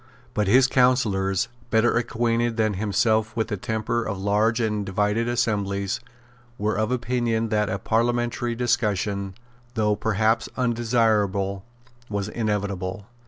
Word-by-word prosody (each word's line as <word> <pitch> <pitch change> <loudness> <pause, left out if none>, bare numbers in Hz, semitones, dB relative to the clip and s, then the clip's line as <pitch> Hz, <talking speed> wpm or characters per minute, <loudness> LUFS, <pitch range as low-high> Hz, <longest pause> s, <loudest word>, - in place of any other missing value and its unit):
But 105 -3 0
his 125 +6 +6
counsellors, 110 -7 +2 0.2
better 110 +1 +3
acquainted 115 0 0
than 110 -1 +2
himself 110 +2 +1
with 110 -1 -1
the 105 - -1
temper 110 +2 -2
of 100 -3 -3
large 105 +4 +2
and 105 -3 0
divided 105 +4 0
assemblies, 100 -4 -1 0.6
were 105 0 0
of 110 +3 0
opinion 120 -2 0
that 105 -1 +1
a 100 - -1
parliamentary 120 +2 0
discussion, 100 -5 -1 0.4
though 105 -2 +2
perhaps 110 +1 +1
undesirable, 110 -5 +1 0.4
was 100 0 -2
inevitable. 100 -3 -2
110 Hz, 120 wpm, -24 LUFS, 100-120 Hz, 0.6 s, his